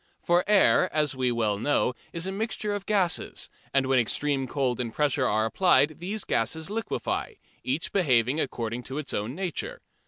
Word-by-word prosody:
For 175 +1 +3
air, 195 -2 +5
as 150 -3 0
we 130 -1 +1
well 110 -4 0
know, 125 0 +1 0.2
is 170 +1 -3
a 190 - -2
mixture 210 0 -2
of 200 -1 -5
gases, 195 -5 0 0.2
and 135 -1 +2
when 130 -1 +3
extreme 135 +3 0
cold 130 -2 -1
and 120 -2 -2
pressure 145 -1 +1
are 110 +1 +2
applied 155 +3 +3
these 200 +4 -3
gases 160 - -1
liquefy, 225 - -3 0.3
each - - -2
behaving 130 - +2
according 120 -4 -2
to 135 - -6
its 150 -3 -4
own 110 +6 -2
nature. 195 - -4
145 Hz, 175 wpm, -27 LUFS, 125-185 Hz, 0.3 s, air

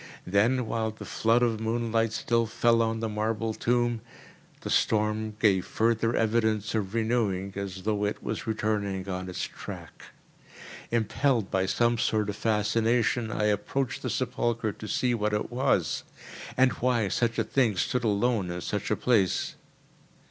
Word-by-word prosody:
Then 115 +7 +2
while 110 0 -1
the 110 - -9
flood 115 +2 +2
of 115 -2 +1
moonlight 115 0 0
still 115 0 +1
fell 115 +1 +3
on 115 0 0
the 115 - 0
marble 110 +1 -1
tomb, 120 0 0 0.6
the - - -5
storm 110 0 +1
gave 95 -5 +3
further 115 0 +1
evidence 110 -1 +1
of 105 -1 -2
renewing, 110 -5 0
as 95 -1 -5
though 105 0 0
it 105 - -3
was 120 - -4
returning 105 -3 -1
on 95 -1 -4
its 90 - -4
track. - - -8 0.8
Impelled 120 0 +1
by 95 0 +1
some 120 +3 +2
sort 105 -2 +1
of - - -8
fascination, 115 +2 +1
I 105 - -1
approached 105 +5 0
the - - -3
sepulchre 120 -3 -1
to 105 - -9
see 125 +2 +1
what 105 -2 0
it 105 - -1
was, 125 +2 +1 0.5
and 130 0 +5
why 120 -4 +1
such 115 +3 0
a - - +2
thing 120 -7 +1
stood 125 +7 0
alone 105 -2 +1
in 90 0 -4
such 105 +4 -3
a 105 - +2
place. 105 -8 +1
110 Hz, 155 wpm, -28 LUFS, 105-120 Hz, 0.8 s, and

